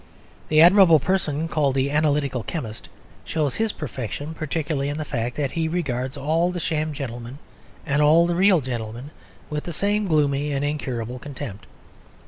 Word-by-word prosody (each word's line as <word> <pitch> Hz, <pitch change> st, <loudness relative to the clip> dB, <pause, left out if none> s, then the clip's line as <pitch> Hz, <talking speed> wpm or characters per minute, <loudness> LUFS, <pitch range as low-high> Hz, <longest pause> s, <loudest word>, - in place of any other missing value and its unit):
The 155 Hz, 0 st, +5 dB
admirable 180 Hz, -2 st, +7 dB
person 165 Hz, -2 st, 0 dB
called 145 Hz, -4 st, +1 dB
the 135 Hz, +1 st, +1 dB
Analytical 145 Hz, -4 st, +1 dB
Chemist 110 Hz, -5 st, -6 dB, 0.3 s
shows 150 Hz, -4 st, -1 dB
his 225 Hz, -1 st, 0 dB
perfection 145 Hz, -, -5 dB
particularly 155 Hz, -2 st, -2 dB
in 145 Hz, -, -3 dB
the 155 Hz, -, -3 dB
fact 120 Hz, -3 st, -3 dB
that 140 Hz, -3 st, -1 dB
he 165 Hz, -1 st, -1 dB
regards 135 Hz, -5 st, -2 dB
all 160 Hz, +5 st, +1 dB
the 180 Hz, -1 st, -3 dB
sham 155 Hz, -1 st, -1 dB
gentlemen 125 Hz, -3 st, -6 dB, 0.5 s
and 150 Hz, -1 st, +1 dB
all 160 Hz, +3 st, +6 dB
the 175 Hz, -, 0 dB
real 185 Hz, -2 st, +4 dB
gentlemen 120 Hz, +1 st, -5 dB, 0.4 s
with 150 Hz, 0 st, -3 dB
the 170 Hz, -, -5 dB
same 205 Hz, +4 st, 0 dB
gloomy 145 Hz, -2 st, +1 dB
and 140 Hz, +1 st, -1 dB
incurable 125 Hz, -5 st, -3 dB
contempt. 125 Hz, -9 st, -8 dB
150 Hz, 160 wpm, -23 LUFS, 130-160 Hz, 0.5 s, admirable